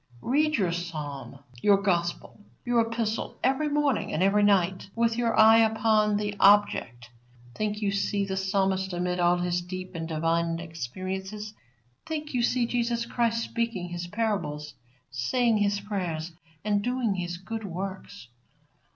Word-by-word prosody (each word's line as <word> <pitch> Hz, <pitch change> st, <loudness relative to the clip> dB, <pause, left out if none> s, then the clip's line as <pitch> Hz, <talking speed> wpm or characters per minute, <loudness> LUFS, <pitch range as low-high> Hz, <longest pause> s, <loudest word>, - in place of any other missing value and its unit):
Read 300 Hz, +4 st, +2 dB
your 185 Hz, -5 st, +1 dB
Psalm, 150 Hz, -6 st, -5 dB, 0.2 s
your 200 Hz, -1 st, +5 dB
Gospel, 175 Hz, +1 st, -2 dB, 0.2 s
your 240 Hz, -1 st, +3 dB
Epistle 230 Hz, -1 st, -2 dB
every 270 Hz, +4 st, +2 dB
morning 290 Hz, -4 st, +1 dB
and 170 Hz, -, 0 dB
every 200 Hz, +2 st, +4 dB
night 190 Hz, -2 st, +2 dB
with 230 Hz, 0 st, +2 dB
your 230 Hz, -2 st, +1 dB
eye 220 Hz, +1 st, +8 dB
upon 220 Hz, -1 st, +3 dB
the 205 Hz, 0 st, -2 dB
object. 195 Hz, -, +3 dB, 0.4 s
Think 210 Hz, -, -2 dB
you 200 Hz, -, +1 dB
see 200 Hz, 0 st, 0 dB
the 190 Hz, -1 st, -3 dB
Psalmist 190 Hz, -1 st, 0 dB
amid 180 Hz, 0 st, -1 dB
all 175 Hz, 0 st, +4 dB
his 175 Hz, 0 st, 0 dB
deep 185 Hz, +1 st, -7 dB
and 165 Hz, -1 st, -4 dB
divine 165 Hz, +1 st, 0 dB
experiences. 185 Hz, -, -5 dB, 0.5 s
Think 305 Hz, -2 st, -4 dB
you 250 Hz, -, +1 dB
see 245 Hz, 0 st, +2 dB
Jesus 235 Hz, 0 st, -1 dB
Christ 230 Hz, -1 st, 0 dB
speaking 230 Hz, -8 st, -3 dB
His 175 Hz, 0 st, -5 dB
parables, 185 Hz, -8 st, -2 dB, 0.4 s
saying 220 Hz, -, +1 dB
His 205 Hz, -1 st, +1 dB
prayers, 180 Hz, -5 st, -3 dB, 0.3 s
and 205 Hz, -1 st, +2 dB
doing 245 Hz, -2 st, 0 dB
His 175 Hz, -2 st, -4 dB
good 220 Hz, +5 st, -6 dB
works. 190 Hz, -5 st, -6 dB
200 Hz, 145 wpm, -27 LUFS, 175-225 Hz, 0.5 s, eye